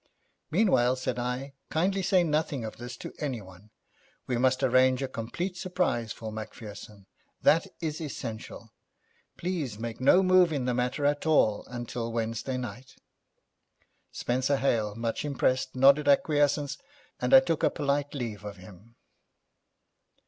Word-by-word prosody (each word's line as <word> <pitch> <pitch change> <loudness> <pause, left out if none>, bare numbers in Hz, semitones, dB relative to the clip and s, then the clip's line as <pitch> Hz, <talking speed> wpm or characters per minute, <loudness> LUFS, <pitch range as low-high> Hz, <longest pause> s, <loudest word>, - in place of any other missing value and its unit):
'Meanwhile,' 150 - +3
said 125 -1 -3
I, 125 +3 -3 0.2
'kindly 190 +5 +1
say 185 -1 +3
nothing 150 -6 -1
of 110 - -7
this 120 0 -8
to - - -8
anyone. 105 -8 -6 0.6
We 125 - -1
must 130 +2 +2
arrange 130 +1 +4
a - - -1
complete 170 +11 -4
surprise 180 - -1
for 110 -1 -6
Macpherson. 105 -2 -9 0.4
That 165 +5 +4
is 155 -1 -3
essential. 115 -5 -7 0.6
Please 165 - -3
make 115 +1 -6
no 180 +8 +6
move 185 -2 +5
in 140 -5 -1
the 125 - +1
matter 125 +4 -1
at 145 +2 +1
all 110 -9 +3
until 120 -1 -5
Wednesday 115 +3 -2
night.' 125 +2 -7 1.2
Spenser 130 +3 0
Hale, 110 -6 0
much 115 0 -2
impressed, 130 -3 0
nodded 140 +3 +5
acquiescence, 145 0 +2 0.4
and - - 0
I 265 - +11
took 165 - -1
a - - +4
polite 145 0 -1
leave 115 -6 -4
of 105 -1 -7
him. 100 +5 -15
130 Hz, 140 wpm, -28 LUFS, 115-150 Hz, 1.2 s, I